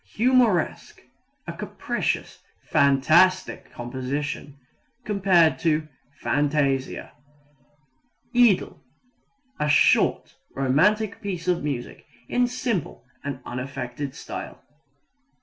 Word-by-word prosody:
Humoresque 235 -6 +1 0.4
a - - -5
capricious, - - -3 0.3
fantastic 155 +7 +3
composition. 135 +3 -5 0.5
(Cf. 170 -6 +2 0.3
fantasia.) 140 -2 0 1.2
Idyl 240 -6 +3 0.8
a 150 - 0
short, 150 - +3 0.2
romantic 185 +11 +2
piece 185 -4 -5
of 175 -3 +1
music 135 -5 -5 0.2
in 245 0 +2
simple 230 - -3 0.2
and 140 -2 -5
unaffected 130 +1 -5
style. - - -8
150 Hz, 75 wpm, -24 LUFS, 135-195 Hz, 1.2 s, fantastic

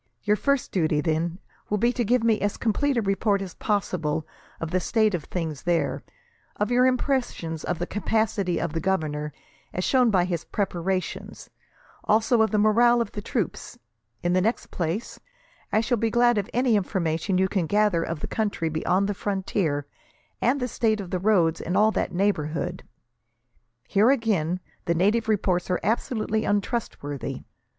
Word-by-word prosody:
Your 210 0 +3
first 280 +4 0
duty, 155 -5 +1
then, 165 +2 -1 0.3
will 210 - +1
be 235 +4 +2
to 245 - 0
give 240 +2 +2
me 225 -2 +2
as 205 0 -1
complete 260 +5 +1
a 230 - +1
report 200 +1 +1
as 190 -2 -6
possible 170 -7 -1 0.3
of 165 0 -4
the 185 - +2
state 215 +3 +2
of 170 -5 -2
things 160 -5 -4
there; 175 -1 0 0.5
of 210 +3 -1
your 250 +1 +5
impressions 250 - -1
of 180 - -2
the 175 - -2
capacity 210 -3 0
of 170 -2 -2
the 165 - -1
governor, 155 -5 -1 0.4
as 180 - -2
shown 250 +1 +4
by 185 -4 +3
his 170 -2 -2
preparations; 185 -2 -3 0.5
also 220 +2 +3
of 220 - +3
the 215 - 0
morale 235 +3 +5
of 235 - -1
the 205 - -5
troops. 210 - -3 0.5
In 175 0 +1
the 185 - +3
next 225 +5 -1
place, 175 +6 -3 0.5
I 215 - +3
shall 245 +1 0
be 225 - +1
glad 240 -1 +3
of 200 +3 -4
any 245 -1 +2
information 185 -2 0
you 190 +1 +3
can 185 -4 -1
gather 205 -3 +2
of 165 -2 -4
the - - -3
country 205 -7 -1
beyond 180 +5 +1
the 205 - -1
frontier, 190 -7 -1 0.6
and 260 +4 +2
the 250 - -1
state 220 -2 0
of 190 -3 -6
the 185 - 0
roads 175 -5 +2
in 180 - -2
all 215 +2 +5
that - - -1
neighbourhood. 175 -2 -1 1.1
Here, 210 +4 +4
again, 195 - +1 0.2
the 170 - +1
native 210 +6 +2
reports 185 -4 +1
are 180 - +1
absolutely 220 0 0
untrustworthy. 200 - -2
200 Hz, 175 wpm, -25 LUFS, 175-220 Hz, 1.1 s, your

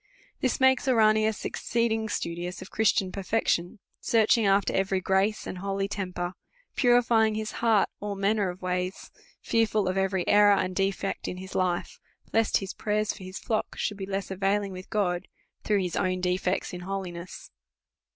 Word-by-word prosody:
This 255 - 0
makes 260 +1 +4
Ouranius 215 -3 +3
exceeding 225 -1 -1
studious 175 -1 -3
of 190 - -10
Christian 205 -3 +2
perfection, 190 -2 -1 0.2
searching 225 -1 +3
after 195 0 +3
every 190 0 +1
grace 195 +3 +1
and 180 - -6
holy 195 0 -2
temper, 180 -3 -4 0.4
purifying 235 -3 +4
his 215 0 -3
heart 225 -3 +4
all 205 -1 -4
manner 200 0 +1
of 180 +1 -8
ways, 180 +1 -3 0.3
fearful 215 -3 +1
of 185 +1 0
every 190 -2 0
error 205 0 +6
and 185 -1 -1
defect 195 0 -1
in 180 - -4
his 190 +1 -9
life, 180 -2 -1 0.3
lest 225 0 +3
his 195 -1 -5
prayers 210 0 -1
for 195 - -11
his 185 +1 -7
flock 220 -2 -2
should 205 - -2
be 190 -1 -5
less 195 0 -3
availing 195 +1 0
with 185 0 -9
God, 185 -4 0 0.4
through 205 -2 +2
his 180 -2 -3
own 185 -1 0
defects 180 +1 -1
in 180 - -5
holiness. 180 -2 -6
195 Hz, 160 wpm, -27 LUFS, 185-215 Hz, 0.4 s, error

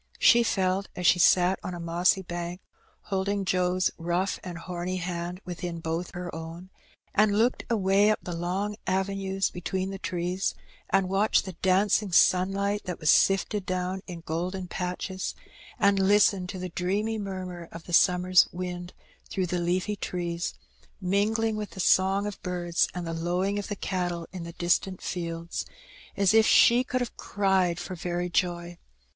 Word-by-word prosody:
She 240 - +6
felt 195 -3 0
as 180 - -4
she 180 - +5
sat 180 +2 +4
on 180 - -4
a - - -7
mossy 175 +3 +1
bank, 175 0 -5 0.4
holding 200 0 -1
Joe's 180 0 +1
rough 175 +3 -1
and 180 -2 -6
homy 180 +1 -4
hand 175 0 -4
within 175 -1 -5
both 165 +3 -4
her 175 -1 -5
own, 165 +3 -8 0.4
and 210 -1 +3
looked 235 +3 +1
away 200 -2 +3
up 215 - +3
the 175 - -5
long 190 +5 -2
avenues 195 0 0
between 185 +2 -3
the 195 - -6
trees, 180 +1 -2 0.3
and 195 -1 +2
watched 195 +3 +2
the 190 - -5
dancing 190 +3 +2
sunlight 195 +3 +3
that 180 -2 -4
was 155 -2 +4
sifted 195 +1 +3
down 185 +1 -2
in 175 -3 -7
golden 180 +3 -3
patches, 185 +1 -4 0.4
and 200 0 +3
listened 195 -1 +3
to 190 - -5
the 185 0 -5
dreamy 200 +6 -1
murmur 185 -4 -6
of 165 - -9
the 175 - -9
summer's 180 +1 +5
wind 180 0 -5 0.4
through 190 - -1
the 180 0 -2
leafy 180 +4 0
trees, 175 -3 -3 0.4
mingling 215 +4 +1
with 210 -1 -4
the - - -11
song 190 +2 +3
of 205 -1 -6
birds 175 -1 0
and 180 -1 -4
the 165 - -3
lowing 180 +5 -1
of 205 - -5
the 205 - -3
cattle 175 -3 -2
in 180 -3 -6
the 170 - -8
distant 180 +2 0
fields, 170 -1 -4 0.5
as 200 0 +4
if 220 0 +6
she 240 +2 +6
could 255 0 -2
have 245 - -4
cried 190 -4 +1
for 185 - -6
very 175 0 -3
joy. 175 -1 -1
185 Hz, 165 wpm, -27 LUFS, 175-195 Hz, 0.5 s, She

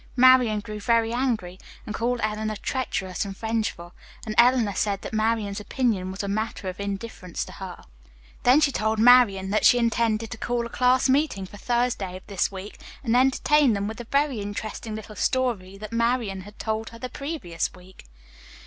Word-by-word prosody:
Marian 250 -4 +5
grew 210 +1 -7
very 230 +1 +2
angry, 225 -8 -1 0.3
and 215 - -5
called 240 +2 -1
Eleanor 215 0 -1
treacherous 200 -7 -2
and 195 -1 -6
revengeful, 220 -6 -3 0.3
and 215 - -3
Eleanor 240 -3 +4
said 200 +1 -1
that - - -7
Marian's 215 -2 0
opinion 210 -4 -1
was 190 +2 -5
a - - -3
matter 210 -1 -3
of 185 - -8
indifference 200 -2 -5
to - - -11
her. 185 -2 -9 0.6
"Then 260 +5 +5
she 290 -2 +3
told 220 -3 0
Marian 215 -5 +5
that 215 - +1
she 245 - +7
intended 230 -2 +1
to 225 - -7
call 240 -1 -1
a - - -6
class 250 +2 +3
meeting 265 -8 +1
for 205 - -12
Thursday 235 -5 -1
of 185 - -16
this 200 -2 -1
week 195 +2 -8 0.2
and 235 -2 +1
entertain 265 +1 +4
them 200 0 -1
with 220 - -6
the 240 - -7
very 280 -4 +1
interesting 215 +2 -5
little 215 0 -8
story 215 -8 -1
that 215 +2 -8
Marian 230 -4 0
had 205 +3 -13
told 220 0 -3
her 230 - -12
the 255 - -5
previous 275 - -4
week. 185 +1 -16
220 Hz, 185 wpm, -25 LUFS, 200-245 Hz, 0.6 s, she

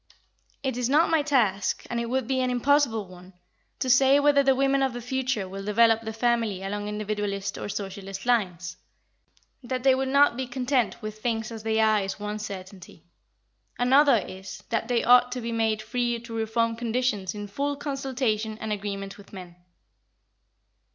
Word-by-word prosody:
It 260 -3 -2
is 250 0 -1
not 315 +4 +4
my 325 -2 +4
task, 225 -10 +1
and 240 - -2
it 235 0 -3
would 260 -1 -1
be 260 -1 0
an 255 - 0
impossible 245 -4 +2
one, 180 +1 -14 0.4
to - - -2
say 265 +3 +5
whether 285 -1 +4
the 270 -1 +3
women 275 +1 +2
of 265 -2 +1
the 245 - -5
future 250 -4 -2
will 195 +1 -7
develop 225 +2 +4
the 220 -1 -5
family 225 -4 0
along 205 +1 -4
individualist 205 -2 -3
or - - -6
socialist 195 0 -6
lines. 185 -7 0 0.8
That 255 0 -4
they 270 -1 +6
will 265 +1 -1
not 280 -1 +4
be 260 -1 -3
content 250 -2 -1
with 215 0 -7
things 225 -1 -2
as 225 -1 -7
they 220 0 0
are 215 -1 +4
is 195 +1 -4
one 210 +1 -4
certainty. 190 -4 -9 0.7
Another 270 +1 +5
is 190 +1 -9
that 230 -1 -1
they 240 -1 +1
ought 245 0 +5
to 250 - -4
be 235 -1 -4
made 220 -1 0
free 240 +1 -1
to 235 0 -10
reform 225 +1 0
conditions 230 -4 -1
in 205 0 -5
full 280 +8 -2
consultation 260 -6 -2
and 220 -1 -3
agreement 200 -1 -5
with 200 - -15
men. 180 -3 -10
230 Hz, 180 wpm, -26 LUFS, 205-255 Hz, 0.8 s, they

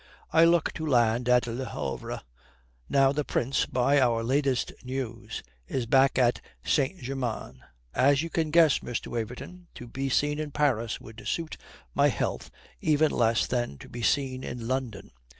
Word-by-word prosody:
I 165 +1 +6
look 170 -1 +3
to 160 - -4
land 120 -2 +2
at 125 -1 +5
Le 120 +2 -4
Havre. - - -4 0.7
Now, 135 -1 +4
the 150 +1 -1
Prince, 135 0 0
by 135 +3 +3
our 115 -3 +2
latest 135 0 +1
news, 120 -4 -5 0.2
is 130 -3 -2
back 135 +3 +4
at 125 -2 +3 0.2
St. 145 +8 +1
Germain. 125 -3 -4 0.3
As 140 +2 +4
you 165 - -5
can 160 -2 0
guess, 160 -2 +5
Mr. 120 - -4
Waverton, 125 +10 -6
to 120 - -9
be 135 +3 -3
seen 145 +3 +1
in 155 -1 -3
Paris 130 -6 0
would 110 -1 -11
suit 165 +6 -2 0.4
my - - +4
health - - -2 0.3
even 155 0 +3
less 115 -1 +2
than 120 - -2
to - - -12
be 120 - -7
seen 130 +1 0
in 120 -2 -5
London. 125 -6 -3
130 Hz, 165 wpm, -28 LUFS, 120-145 Hz, 0.7 s, I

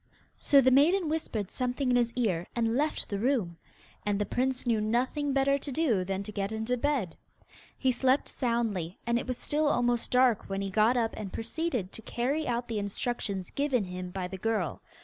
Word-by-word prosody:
So 280 -1 +5
the 260 0 +4
maiden 320 +6 +4
whispered 230 - -2
something 250 +1 -1
in - - +3
his 240 -1 +2
ear, 190 -9 0
and 230 -1 +1
left 300 +3 0
the 200 - -3
room. 220 -9 0 0.5
And 205 -1 0
the 205 - 0
prince 260 +3 -1
knew 230 -3 +2
nothing 255 +6 0
better 275 +1 +2
to 280 - -5
do 245 - +1
than 195 +1 -3
to 210 - -7
get 200 0 -2
into 220 +3 -1
bed. 250 - -1 0.6
He 260 - +2
slept 260 +2 +2
soundly, 225 - -1
and 235 0 +2
it - - -6
was 255 -1 -2
still 300 +1 0
almost 245 -4 +1
dark 250 -5 +3
when 195 0 -2
he 195 - -3
got 220 +5 +3
up 230 -2 +1
and 205 -3 -6
proceeded 235 - -2
to - - -7
carry 270 +8 -1
out 240 0 -1
the 225 -2 -2
instructions 200 -2 -3
given 275 -5 +1
him 180 -1 -6
by 180 0 -4
the 190 +1 -7
girl. 215 -5 -1
235 Hz, 200 wpm, -29 LUFS, 200-265 Hz, 0.6 s, So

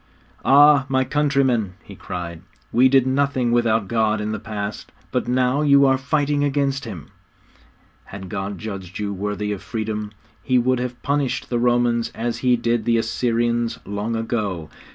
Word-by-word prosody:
'Ah, 145 0 +6
my 130 -1 +2
countrymen,' 135 -7 +1
he - - -12
cried, 85 -2 -6 0.3
'we 125 +3 +5
did 135 -1 +4
nothing 130 -2 +1
without 115 -3 +2
God 110 0 +1
in 105 0 -3
the 110 - -3
past, 105 -1 -6 0.2
but - - -1
now 125 +3 +1
you 140 -2 +5
are 135 -1 +4
fighting 145 +1 0
against 140 -1 0
Him. 95 -9 -8 0.9
Had 95 -1 -9
God 95 +2 -4
judged 95 -3 -7
you 105 -1 -3
worthy 105 +1 -3
of 100 - -4
freedom, 110 -2 -4 0.3
He 130 -2 +1
would 125 +1 +2
have 125 0 -5
punished 140 -2 -1
the 120 - +1
Romans 120 -1 +1
as 115 +1 -3
He 125 -1 +3
did 115 -1 -1
the 115 -1 +3
Assyrians 115 0 0
long 105 +3 -3
ago. 105 -8 -3
120 Hz, 160 wpm, -22 LUFS, 105-130 Hz, 0.9 s, Ah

